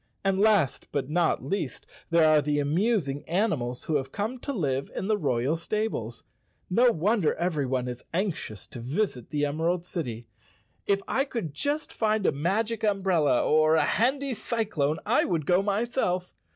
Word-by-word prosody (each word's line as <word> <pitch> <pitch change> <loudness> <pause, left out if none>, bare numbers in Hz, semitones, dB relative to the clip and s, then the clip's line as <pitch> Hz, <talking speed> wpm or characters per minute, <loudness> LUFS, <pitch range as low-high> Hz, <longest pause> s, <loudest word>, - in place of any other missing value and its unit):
And 195 -1 +1
last 205 -9 +3
but 140 0 -2
not 165 -6 +1
least 160 -3 -3 0.2
there 165 -2 +5
are 155 -1 +5
the 145 0 0
amusing 150 -1 0
animals 155 - 0
who 155 - +1
have 135 -1 -5
come 220 +5 -3
to 280 - -4
live 140 - -1
in 190 - -3
the 215 - +3
royal 140 - 0
stables. 165 - -3 0.5
No 240 +5 +5
wonder 195 -1 +1
everyone 140 -7 -1
is 125 0 -6
anxious 170 - -3
to 120 - -8
visit 130 - -2
the 145 -1 0
Emerald 165 +4 -1
City. 120 -11 -4 0.6
If 195 -1 +2
I 270 - +1
could 230 - -4
just 290 - -2
find 215 -2 +1
a - - +4
magic 210 +10 -1
umbrella 190 - +2
or 155 +1 +4
a 160 - +4
handy 270 +4 +1
cyclone 205 - -1
I - - +3
would 165 -5 -1
go 180 +4 +4
myself. 200 -3 -1
175 Hz, 165 wpm, -27 LUFS, 145-215 Hz, 0.6 s, there